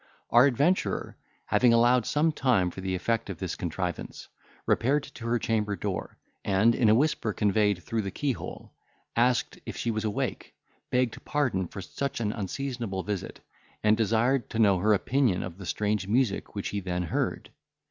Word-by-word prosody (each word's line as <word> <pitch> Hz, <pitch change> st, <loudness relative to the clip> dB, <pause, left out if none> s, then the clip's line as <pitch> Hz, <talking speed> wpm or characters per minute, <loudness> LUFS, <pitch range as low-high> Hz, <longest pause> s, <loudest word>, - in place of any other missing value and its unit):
Our 120 Hz, +3 st, +7 dB
adventurer, 145 Hz, +8 st, 0 dB, 0.3 s
having 120 Hz, -1 st, +4 dB
allowed 120 Hz, 0 st, +4 dB
some 155 Hz, +2 st, +2 dB
time 120 Hz, -, +2 dB
for 95 Hz, -, -8 dB
the 95 Hz, 0 st, -2 dB
effect 115 Hz, +4 st, -1 dB
of 95 Hz, -, -5 dB
this 90 Hz, -1 st, -4 dB
contrivance, 90 Hz, +1 st, -4 dB, 0.4 s
repaired 140 Hz, +4 st, +2 dB
to 115 Hz, -4 st, -8 dB
her 120 Hz, +1 st, +2 dB
chamber 105 Hz, -3 st, 0 dB
door, -, -, -4 dB, 0.3 s
and, 100 Hz, +4 st, +3 dB
in 115 Hz, -2 st, +3 dB
a 110 Hz, -, +6 dB
whisper, 125 Hz, -5 st, +1 dB
conveyed 105 Hz, -2 st, +1 dB
through 115 Hz, -1 st, -1 dB
the 100 Hz, -, -3 dB
keyhole, 135 Hz, +5 st, -4 dB, 0.4 s
asked 125 Hz, +1 st, +1 dB
if -, -, -7 dB
she 115 Hz, -, -1 dB
was 110 Hz, 0 st, -2 dB
awake, 105 Hz, -2 st, -3 dB, 0.3 s
begged 125 Hz, -2 st, 0 dB
pardon 130 Hz, -12 st, 0 dB
for 95 Hz, -, -8 dB
such 140 Hz, +7 st, -4 dB
an 105 Hz, -3 st, 0 dB
unseasonable 115 Hz, -2 st, -3 dB
visit, 105 Hz, -3 st, -5 dB, 0.4 s
and 105 Hz, 0 st, +5 dB
desired 115 Hz, +4 st, +1 dB
to -, -, -5 dB
know 100 Hz, -5 st, +4 dB
her 105 Hz, +3 st, +4 dB
opinion 120 Hz, -3 st, +1 dB
of 90 Hz, 0 st, -8 dB
the 95 Hz, -, -7 dB
strange 105 Hz, +2 st, -1 dB
music 115 Hz, -1 st, 0 dB
which 100 Hz, -, -3 dB
he 100 Hz, -, -2 dB
then 90 Hz, -2 st, -2 dB
heard. 85 Hz, -, -2 dB
110 Hz, 170 wpm, -28 LUFS, 95-125 Hz, 0.4 s, Our